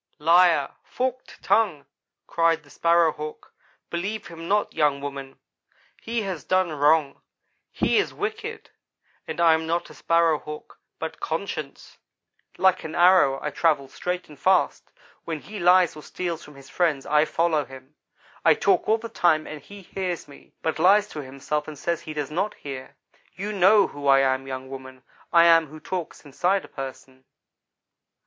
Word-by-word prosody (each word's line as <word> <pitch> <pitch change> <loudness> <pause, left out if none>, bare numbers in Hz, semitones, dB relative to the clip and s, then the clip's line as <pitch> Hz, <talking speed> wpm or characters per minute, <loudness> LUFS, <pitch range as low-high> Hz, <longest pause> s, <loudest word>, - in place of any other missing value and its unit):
"'Liar 165 -2 +4
forked 255 0 -4
tongue,' 180 -11 +2 0.4
cried 165 -1 +1
the 145 - -20
Sparrow 170 -1 +3
hawk. 150 0 -9 0.4
'Believe 200 +5 -3
him 165 0 -9
not, 205 +2 +1
young 145 -2 +2
woman. 140 -1 -7 0.6
He 230 -1 -2
has 185 -7 -5
done 185 -2 +1
wrong. 150 -1 +2 0.5
He - - +2
is - - -1
wicked 440 +2 -5 0.6
and - - -5
I 165 -1 +6
am 160 0 -1
not 170 +1 -2
a - - -12
Sparrow 165 -2 +2
hawk, 150 0 -10 0.2
but - - -6
conscience. - - -5 0.6
Like 190 -1 +3
an 155 - -6
arrow 175 -7 +5
I 150 - -2
travel, 150 -3 +1
straight 180 +6 -4
and 150 -2 -15
fast. 190 -1 +1 0.3
When 160 -2 -4
he 210 0 -9
lies 180 -1 +4
or 155 - -9
steals 170 +1 -5
from 150 - -14
his 135 -1 -14
friends 155 -6 0
I 150 0 +3
follow 165 -2 +1
him. 135 +1 -14 0.5
I - - +6
talk - - +1
all 220 - +4
the 230 +1 -7
time 170 -8 +2
and 155 -1 -8
he 200 +6 -13
hears 180 -1 -4
me, 140 - -17
but 160 - -1
lies 205 +3 +5
to 150 - -6
himself, 140 +3 -4
and 155 -1 -8
says 170 +3 -2
he 155 - -7
does 150 -1 -3
not 190 +7 -1
hear. 135 -1 -8 0.4
You 205 +3 -4
know 200 +1 +5
who 145 -1 -6
I 135 0 +6
am, 135 0 0
young 130 0 -6
woman, 130 -1 -10 0.3
I 170 -1 +6
am 165 -3 +5
what 155 0 -12
talks 180 -4 -5
inside 180 +7 0
a - - -16
person.' 130 -1 -9
160 Hz, 170 wpm, -24 LUFS, 145-185 Hz, 0.6 s, I